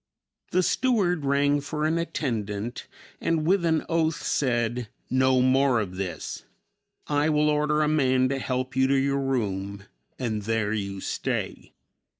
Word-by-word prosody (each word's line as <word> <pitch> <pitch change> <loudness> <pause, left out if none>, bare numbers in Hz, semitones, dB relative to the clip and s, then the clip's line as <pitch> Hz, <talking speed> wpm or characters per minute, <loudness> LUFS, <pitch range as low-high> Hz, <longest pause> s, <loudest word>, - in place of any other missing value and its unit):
The 185 - +2
steward 185 - +1
rang 145 +1 +2
for 150 +1 -3
an 160 +2 +1
attendant, 115 -9 -3 0.3
and 160 -2 0
with 185 +2 +3
an 160 -2 +1
oath 165 -1 0
said, 120 -3 0 0.2
"No 130 0 +3
more 130 -1 +3
of 95 -4 -4
this; 90 -3 -5 0.6
I 145 +1 +1
will 150 0 +3
order 150 +1 +2
a - - +2
man 130 -4 +3
to 135 0 -1
help 130 0 -3
you 130 0 +3
to 140 - +2
your 140 +1 +1
room 100 -7 -2 0.3
and 110 -4 -2
there 110 0 0
you 100 -2 -3
stay." - - -3
135 Hz, 150 wpm, -26 LUFS, 115-150 Hz, 0.6 s, with